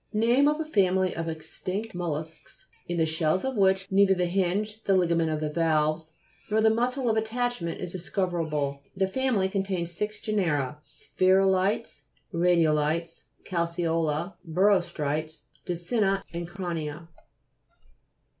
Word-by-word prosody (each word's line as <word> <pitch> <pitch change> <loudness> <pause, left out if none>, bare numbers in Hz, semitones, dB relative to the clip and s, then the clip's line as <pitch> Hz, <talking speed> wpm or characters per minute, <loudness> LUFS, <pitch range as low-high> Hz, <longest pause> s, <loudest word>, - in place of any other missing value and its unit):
Name 235 +6 +4
of 300 +1 +1
a 320 - -2
family 190 - +2
of 165 0 -3
extinct 185 +7 -5
mollusks 160 -2 -6 0.2
in 175 - -2
the 160 - +3
shells 160 +4 0
of 265 -1 -2
which 190 -2 +3
neither 195 0 +5
the 180 -1 +1
hinge, 195 +4 -1
the 195 - +3
ligament 170 -2 +2
of 155 -1 -1
the 155 -1 -2
valves, 155 -1 +1 0.4
nor 215 +1 +2
the 220 0 +5
muscle 250 +3 0
of 225 - +2
attachment 220 -5 -2
is 180 -2 -4
discover 180 -1 -1
able. 145 -3 -2
The 190 0 +1
family 230 -3 +1
contains 190 -3 -2
six 210 +4 -3
genera: 155 - -1
Spherulite.s, 190 +5 +1 0.3
Radiolites, 165 -2 +1 0.2
Calceola, 170 -1 -1
Birostrites, 160 -4 0 0.2
Distinct, 195 +3 0
and 170 0 -4
Crania. 170 -4 -5
180 Hz, 130 wpm, -27 LUFS, 160-200 Hz, 0.4 s, neither